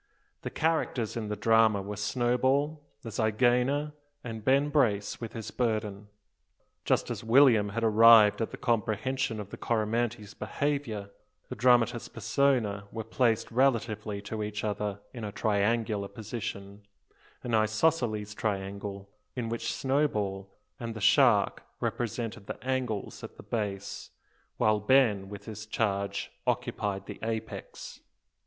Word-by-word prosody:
The -, -, -4 dB
characters 155 Hz, -8 st, -1 dB
in 115 Hz, -2 st, -3 dB
the 105 Hz, -, -2 dB
drama 110 Hz, 0 st, +4 dB
were 105 Hz, +1 st, -5 dB
Snowball, 130 Hz, +8 st, +1 dB, 0.2 s
the 115 Hz, -, -6 dB
zygaena, 125 Hz, +7 st, +1 dB, 0.3 s
and 115 Hz, -3 st, -6 dB
Ben 140 Hz, +4 st, +3 dB
Brace 110 Hz, -10 st, +1 dB
with 115 Hz, -, -6 dB
his 110 Hz, -2 st, -6 dB
burden. 105 Hz, -4 st, -2 dB, 0.8 s
Just -, -, +1 dB
as -, -, -5 dB
William 115 Hz, -3 st, +5 dB
had 115 Hz, +3 st, -3 dB
arrived 110 Hz, -1 st, +7 dB
at 115 Hz, -, -1 dB
the -, -, -8 dB
comprehension 115 Hz, +1 st, -1 dB
of 100 Hz, -1 st, -7 dB
the -, -, -7 dB
Coromantee's 110 Hz, -1 st, -1 dB
behaviour, 140 Hz, -9 st, -3 dB, 0.4 s
the -, -, -5 dB
dramatis 120 Hz, -1 st, +3 dB
persona 115 Hz, -3 st, 0 dB
were 110 Hz, -, -4 dB
placed 115 Hz, 0 st, +1 dB
relatively 110 Hz, -5 st, 0 dB
to 110 Hz, +2 st, -4 dB
each 105 Hz, 0 st, -4 dB
other 105 Hz, -1 st, -2 dB
in 120 Hz, -3 st, -7 dB
a 105 Hz, -, -4 dB
triangular 105 Hz, 0 st, 0 dB
position, 100 Hz, -2 st, -6 dB, 0.6 s
an 120 Hz, -, -3 dB
isosceles 110 Hz, -1 st, +1 dB
triangle, 100 Hz, -1 st, -4 dB, 0.3 s
in 120 Hz, -3 st, -3 dB
which 115 Hz, 0 st, -2 dB
Snowball 105 Hz, -9 st, -1 dB, 0.3 s
and 115 Hz, -2 st, -5 dB
the -, -, -5 dB
shark 100 Hz, -, +4 dB, 0.2 s
represented 115 Hz, -3 st, -3 dB
the -, -, -5 dB
angles 125 Hz, -6 st, -2 dB
at -, -, -9 dB
the -, -, -11 dB
base, 100 Hz, -3 st, -4 dB, 0.5 s
while 110 Hz, -1 st, +3 dB
Ben 105 Hz, -4 st, +3 dB
with 100 Hz, 0 st, -9 dB
his 110 Hz, 0 st, -8 dB
charge 100 Hz, -3 st, -1 dB, 0.2 s
occupied 100 Hz, -2 st, -1 dB
the -, -, -8 dB
apex. 110 Hz, 0 st, -5 dB
110 Hz, 135 wpm, -29 LUFS, 105-120 Hz, 0.8 s, arrived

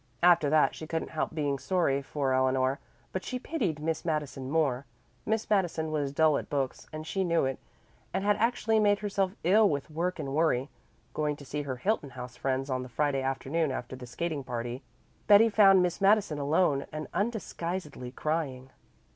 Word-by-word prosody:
After 170 Hz, -4 st, +5 dB
that 155 Hz, 0 st, +4 dB
she 155 Hz, -, -8 dB
couldn't 160 Hz, 0 st, -3 dB
help 155 Hz, -, -2 dB
being 145 Hz, -3 st, -1 dB
sorry 165 Hz, -7 st, +1 dB
for 135 Hz, -1 st, -1 dB
Eleanor, 130 Hz, +1 st, +2 dB, 0.3 s
but 185 Hz, -, -3 dB
she 255 Hz, -, -3 dB
pitied 240 Hz, -, -2 dB
Miss 160 Hz, +1 st, -2 dB
Madison 150 Hz, -5 st, -3 dB
more. 140 Hz, -4 st, 0 dB, 0.4 s
Miss 220 Hz, 0 st, 0 dB
Madison 175 Hz, -6 st, 0 dB
was 145 Hz, -3 st, -1 dB
dull 155 Hz, 0 st, +3 dB
at -, -, -9 dB
books 135 Hz, -3 st, -2 dB
and 155 Hz, 0 st, -6 dB
she 190 Hz, +4 st, -1 dB
knew 170 Hz, -5 st, +2 dB
it, 130 Hz, -1 st, -2 dB, 0.5 s
and 190 Hz, +1 st, -1 dB
had 205 Hz, 0 st, +3 dB
actually 225 Hz, -1 st, +2 dB
made 205 Hz, -1 st, +4 dB
herself 195 Hz, -2 st, -1 dB
ill 205 Hz, +5 st, +5 dB
with 145 Hz, 0 st, -3 dB
work 175 Hz, +4 st, -1 dB
and 135 Hz, -1 st, -4 dB
worry. 145 Hz, -4 st, +1 dB, 0.4 s
Going 150 Hz, -1 st, -1 dB
to 145 Hz, -, -13 dB
see 145 Hz, +2 st, -3 dB
her 135 Hz, -3 st, -4 dB
Hilton 170 Hz, -, -1 dB
House 125 Hz, -2 st, -8 dB
friends 135 Hz, 0 st, -1 dB
on 130 Hz, -2 st, -1 dB
the 125 Hz, -, -8 dB
Friday 140 Hz, +1 st, 0 dB
afternoon 135 Hz, +4 st, -1 dB
after 130 Hz, 0 st, -5 dB
the 125 Hz, -1 st, -9 dB
skating 155 Hz, +3 st, -3 dB
party, 120 Hz, +1 st, -4 dB, 0.5 s
Betty 210 Hz, +2 st, +7 dB
found 195 Hz, -4 st, +6 dB
Miss 180 Hz, +2 st, -2 dB
Madison 200 Hz, -6 st, +3 dB
alone 145 Hz, -1 st, +1 dB
and 155 Hz, 0 st, -5 dB
undisguisedly 180 Hz, -, -3 dB
crying. 135 Hz, -2 st, -3 dB
155 Hz, 180 wpm, -29 LUFS, 135-185 Hz, 0.5 s, Betty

